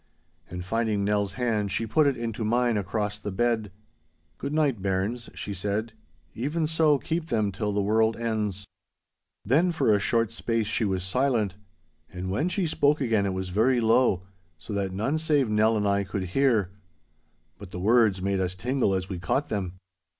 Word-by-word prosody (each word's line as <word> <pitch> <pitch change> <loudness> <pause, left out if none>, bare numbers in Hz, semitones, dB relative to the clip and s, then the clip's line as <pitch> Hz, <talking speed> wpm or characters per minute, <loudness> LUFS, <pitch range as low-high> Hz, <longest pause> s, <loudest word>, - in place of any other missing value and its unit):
And 90 0 -6
finding 110 0 0
Nell's 100 -1 0
hand 110 -5 -1
she 110 +3 -1
put 150 +7 +3
it 135 -3 +1
into 115 -1 -3
mine 120 +2 +2
across 105 +1 -2
the 105 - -5
bed. 110 0 0 0.7
'Good 140 - -4
night, 145 -8 +1
bairns,' 100 +5 -2
she 100 - -5
said, 105 +4 -2 0.4
'even 150 +7 -1
so 155 -2 +3
keep 160 +4 -3
them 110 -6 0
till 105 +2 -2
the 100 0 0
world 110 +2 +2
ends!' 105 -4 -2 0.8
Then 155 - +3
for 155 -9 +2
a 105 - +3
short 115 +2 +1
space 115 -1 -1
she 110 - 0
was 95 -2 -1
silent, 110 -1 +1 0.6
and 95 0 -5
when 150 - 0
she 190 0 0
spoke 150 -2 +2
again 110 -7 +1
it 95 - -1
was 95 0 -3
very 115 +7 +2
low, 115 -5 +3 0.3
so 80 +6 -8
that 100 -2 -1
none 110 +11 -1
save 145 -7 +2
Nell 110 +1 +3
and 105 -1 0
I 100 0 +2
could 95 0 -4
hear. 115 -9 +2 0.9
But 100 -3 -10
the 90 - -7
words 105 -2 +3
made 100 0 0
us 90 -1 -1
tingle 120 -1 0
as 95 -1 -2
we 95 -3 -5
caught 135 +11 -1
them. 95 -4 -2
110 Hz, 180 wpm, -26 LUFS, 100-125 Hz, 0.9 s, put